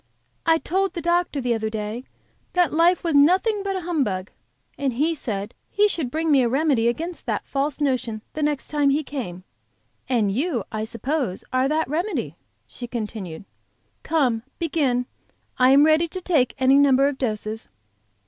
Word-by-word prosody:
"I 325 0 +5
told 380 +4 -1
the 345 - -4
doctor 345 -3 +1
the 245 -2 0
other 220 -1 -2
day 215 +3 -4 0.5
that 355 -4 +2
life 340 +3 +3
was 335 -2 0
nothing 370 +9 +4
but 390 -1 -2
a 375 - -2
humbug, 255 - -1 0.4
and 275 -3 -1
he 305 +7 +1
said 210 -8 -4 0.2
he 415 0 +3
should 320 -10 -2
bring 315 +4 -1
me 275 -2 +5
a 240 - +2
remedy 270 -3 +2
against 330 +9 -3
that - - -2
false 280 +1 -2
notion 255 -6 -1
the 310 - -4
next 295 -2 0
time 290 -2 +2
he 290 +3 +1
came, 220 -12 -6 0.7
and 225 -6 +2
you, 255 - -1
I 215 0 -2
suppose, 240 -2 -2
are 255 +1 +3
that 310 +2 0
remedy," 345 +9 -2 0.3
she 240 - -8
continued. 210 -7 -6 0.6
"Come, 265 -8 +1 0.2
begin; 285 -7 0 0.5
I 255 0 +6
am 280 +2 +7
ready 315 +2 +4
to 370 +3 -5
take 315 -9 +1
any 265 +1 +5
number 275 -1 +5
of 280 -2 -3
doses." 220 -2 -3
275 Hz, 170 wpm, -23 LUFS, 235-320 Hz, 0.7 s, am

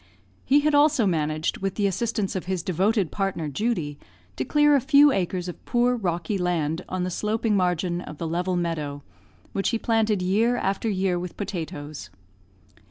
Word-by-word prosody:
He 285 +2 +4
had 300 +1 +1
also 290 -4 +4
managed, 155 -3 -1
with 195 -1 -2
the 205 - 0
assistance 200 +1 -1
of 185 - -3
his 185 -2 -2
devoted 190 +1 +1
partner, 195 -5 -2
Judy, 150 - -2 0.4
to 130 - -2
clear 295 - +4
a 275 - +3
few 290 +1 +6
acres 180 -4 -1
of 180 - -8
poor 245 +1 +2
rocky 180 -2 -2
land 170 -2 -1
on 185 -1 -2
the 180 - -2
sloping 215 +3 0
margin 180 -1 0
of 150 - -9
the 165 - -3
level 180 +3 -1
meadow, 155 -5 -3 0.5
which 195 - 0
he 230 - 0
planted 220 -4 +1
year 225 +7 +2
after 195 +2 -1
year 190 -3 0
with 180 -1 -7
potatoes. 155 - -5
185 Hz, 170 wpm, -25 LUFS, 170-225 Hz, 0.5 s, few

